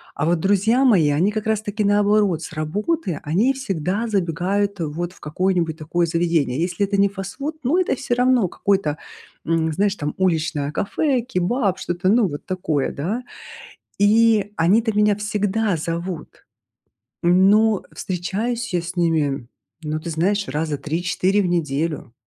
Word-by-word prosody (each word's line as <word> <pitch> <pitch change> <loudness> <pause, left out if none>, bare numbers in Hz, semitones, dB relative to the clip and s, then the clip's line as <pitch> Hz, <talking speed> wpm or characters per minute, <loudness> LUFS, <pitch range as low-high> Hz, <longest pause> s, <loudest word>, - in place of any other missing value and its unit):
А 145 - -1
вот 170 0 +2
друзья 205 +7 +2
мои, 175 - +4
они 170 +8 +2
как 215 0 -3
раз 220 -1 +1
таки, 210 0 -3
наоборот, 205 -4 +2
с - - -7
работы 180 - -2
они 205 - +2
всегда 200 - -2
забегают 195 +1 -1
вот 170 +3 -3
в - - -20
какое-нибудь 165 0 -1
такое 170 +2 0
заведение. 165 -4 0
Если 180 +3 0
это 200 +1 -2
не 200 0 +5
фастфуд, 205 +11 -5
ну, 295 +9 +2
это 365 -7 +1
всё 240 - -2
равно 250 -4 +3
какой-то, 190 -7 0 0.5
эм, 160 -1 +1
знаешь, 200 +3 +1
там 150 -4 -3
уличное 160 -5 0
кафе, 260 +4 0
кебаб, 210 -2 0
что-то 175 +1 -2
ну 225 -2 +4
вот 145 - -7
такое, 160 -7 -1
да. 195 - -3 0.8
И 210 0 +4
они-то 215 +7 +2
меня 210 -1 +4
всегда 210 0 0
зовут. 170 +1 -5 0.8
Но 195 +4 +4
встречаюсь 220 +7 -3
я 175 - +1
с 180 +2 -7
ними, 150 -7 0 0.4
ну, 155 0 -3
ты 170 - -7
знаешь, 195 +6 0
раза 150 -1 -2
3-4 180 +6 0
в - - 0
неделю. 155 -5 -2
185 Hz, 150 wpm, -21 LUFS, 165-210 Hz, 0.8 s, не